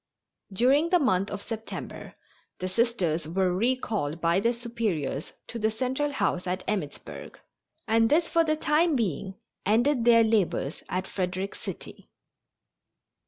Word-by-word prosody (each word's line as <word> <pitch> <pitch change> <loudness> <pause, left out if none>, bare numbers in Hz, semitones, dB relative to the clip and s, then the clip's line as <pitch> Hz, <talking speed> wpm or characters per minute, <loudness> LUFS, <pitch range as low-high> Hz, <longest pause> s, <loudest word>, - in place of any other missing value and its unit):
During 265 - +3
the 360 - +5
month 205 - +1
of 205 0 -5
September 225 -1 -7 0.4
the 185 - -3
Sisters 185 -7 0
were 180 +2 +1
recalled 210 - 0
by 170 +2 +2
their 230 +4 +2
Superiors 225 - -3
to 235 - -6
the 220 0 +2
Central 260 +6 -1
House 200 -8 -1
at 185 +1 -2
Emmittsburg, 160 -9 -5 0.5
and 225 0 +4
this 325 +2 +3
for 335 - +3
the 310 -1 +1
time 310 +1 +2
being 195 - -2 0.3
ended 240 +5 +2
their 230 -1 +6
labors 205 -9 0
at 185 +1 -1
Frederick 185 +1 -3
City. - - -9
220 Hz, 135 wpm, -27 LUFS, 185-250 Hz, 0.5 s, their